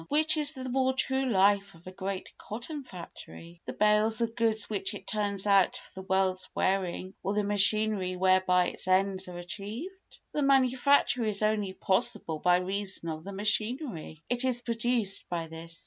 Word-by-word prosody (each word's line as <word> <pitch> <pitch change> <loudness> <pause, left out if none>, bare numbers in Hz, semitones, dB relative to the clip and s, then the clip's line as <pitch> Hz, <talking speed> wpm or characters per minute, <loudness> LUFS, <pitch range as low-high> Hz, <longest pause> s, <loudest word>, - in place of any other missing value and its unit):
Which 310 +1 +4
is 300 -1 0
the 260 -2 -7
more 260 +1 +1
true 265 0 0
life 200 -2 +2
of 165 - -19
a 185 - -8
great 190 0 -6
cotton 250 +7 -6
factory—the 170 -4 -10
bales 210 +1 +2
of 230 -1 -1
goods 220 -2 +2
which 205 -1 -2
it - - -10
turns 205 -2 -1
out 200 -2 +3
for - - -14
the 190 - -15
world's 190 -1 +1
wearing 185 -1 -1
or 200 +2 -2
the 210 - +1
machinery 205 -2 +2
whereby 185 -1 +3
its - - -7
ends 190 0 +1
are 180 -1 -8
achieved? 205 - -6 0.4
The 300 - -1
manufacture 265 -1 +3
is 215 -1 0
only 210 -3 0
possible 175 -4 0
by 180 +2 +4
reason 190 -1 -2
of 155 0 -5
the 200 - -7
machinery; 215 - -1
it 245 +1 0
is 250 -2 0
produced 230 -3 -1
by 170 -2 -3
this. 165 +1 -8
200 Hz, 170 wpm, -29 LUFS, 185-235 Hz, 0.4 s, Which